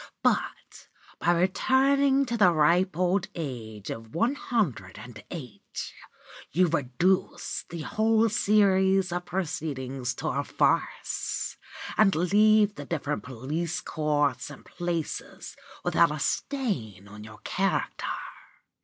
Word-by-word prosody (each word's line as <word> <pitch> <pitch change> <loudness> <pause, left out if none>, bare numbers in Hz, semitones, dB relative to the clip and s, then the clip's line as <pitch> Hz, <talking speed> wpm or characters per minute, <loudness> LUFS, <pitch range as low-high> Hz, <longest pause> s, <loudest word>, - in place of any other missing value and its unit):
But, - - -1 0.3
by 170 - +3
returning 270 +8 +3
to 240 -2 -2
the 195 -6 +5
ripe 170 +3 +3
old 185 +1 +1
age 115 - -6
of 115 +2 -8
one 230 +10 +2
hundred 175 - -2
and 120 -3 -10
eight, 125 - -7 0.6
you 180 +4 +3
reduce 170 +6 0
the 170 -2 -6
whole 220 +6 +2
series 195 -3 +3
of 175 0 -3
proceedings 135 -8 -3
to - - -3
a - - -1
farce, - - -1 0.4
and 195 -5 +5
leave 210 +4 +4
the 145 - -8
different 150 -2 -2
police 145 +7 -3
courts 145 -4 0
and - - -12
places 175 -3 -4 0.3
without - - +4
a - - -3
stain 120 - -2
on 105 +1 -11
your 105 0 -11
character. - - -1
175 Hz, 120 wpm, -27 LUFS, 135-200 Hz, 0.6 s, the